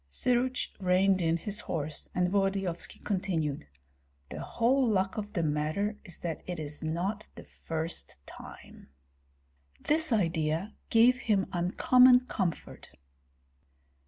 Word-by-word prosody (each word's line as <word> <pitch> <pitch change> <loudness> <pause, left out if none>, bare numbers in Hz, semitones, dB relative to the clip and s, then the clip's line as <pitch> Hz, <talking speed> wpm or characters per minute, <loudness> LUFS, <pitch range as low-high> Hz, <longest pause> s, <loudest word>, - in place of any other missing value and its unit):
Syruts 250 - +1
reined 185 0 +3
in 165 0 +2
his 210 +4 -3
horse, 155 -5 -4
and 180 0 +2
Volodyovski 195 -3 -1
continued: 165 - -2 0.6
"The - - -7
whole 260 +4 +1
luck 190 -2 0
of 210 -1 -5
the 170 -5 0
matter 155 +8 -1
is 175 -4 -9
that 165 -3 -4
it 180 -2 -4
is 150 -1 -5
not 180 +7 -3
the - - -10
first 165 - -5
time!" - - -13 0.9
This 315 0 +1
idea 165 -1 0 0.2
gave 240 +3 +5
him 205 -6 +1
uncommon 250 +8 +5
comfort. 190 -9 -4
190 Hz, 120 wpm, -29 LUFS, 165-215 Hz, 0.9 s, gave